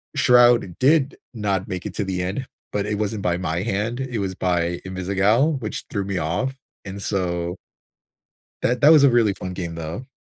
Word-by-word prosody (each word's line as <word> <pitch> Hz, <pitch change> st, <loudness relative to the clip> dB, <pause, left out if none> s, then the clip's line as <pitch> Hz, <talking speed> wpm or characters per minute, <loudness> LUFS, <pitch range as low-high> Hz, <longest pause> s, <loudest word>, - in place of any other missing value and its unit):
Shroud 120 Hz, -7 st, +4 dB
did 140 Hz, +1 st, +3 dB, 0.2 s
not 100 Hz, -4 st, -1 dB
make 90 Hz, -1 st, -5 dB
it -, -, -7 dB
to 105 Hz, -, -1 dB
the 95 Hz, -1 st, -2 dB
end, 100 Hz, +9 st, -3 dB, 0.2 s
but 100 Hz, -1 st, -1 dB
it 105 Hz, -1 st, -2 dB
wasn't 105 Hz, -1 st, -2 dB
by 85 Hz, -1 st, +1 dB
my 85 Hz, 0 st, -2 dB
hand. 115 Hz, +3 st, -2 dB
It 125 Hz, -4 st, -3 dB
was 95 Hz, -2 st, -3 dB
by 85 Hz, -2 st, -1 dB
Invisigal, 100 Hz, -, +1 dB
which 110 Hz, -, -4 dB
threw 100 Hz, -, -2 dB
me 100 Hz, -1 st, -2 dB
off, 90 Hz, +13 st, -1 dB, 0.3 s
and 95 Hz, +1 st, -7 dB
so 90 Hz, -3 st, -2 dB, 1.1 s
that 125 Hz, 0 st, 0 dB
that 150 Hz, -, +8 dB
was 155 Hz, -3 st, +7 dB
a 140 Hz, -, +7 dB
really 115 Hz, -4 st, +3 dB
fun 90 Hz, -1 st, -6 dB
game, 85 Hz, -2 st, -5 dB
though. 85 Hz, +10 st, -6 dB
100 Hz, 190 wpm, -22 LUFS, 90-120 Hz, 1.1 s, that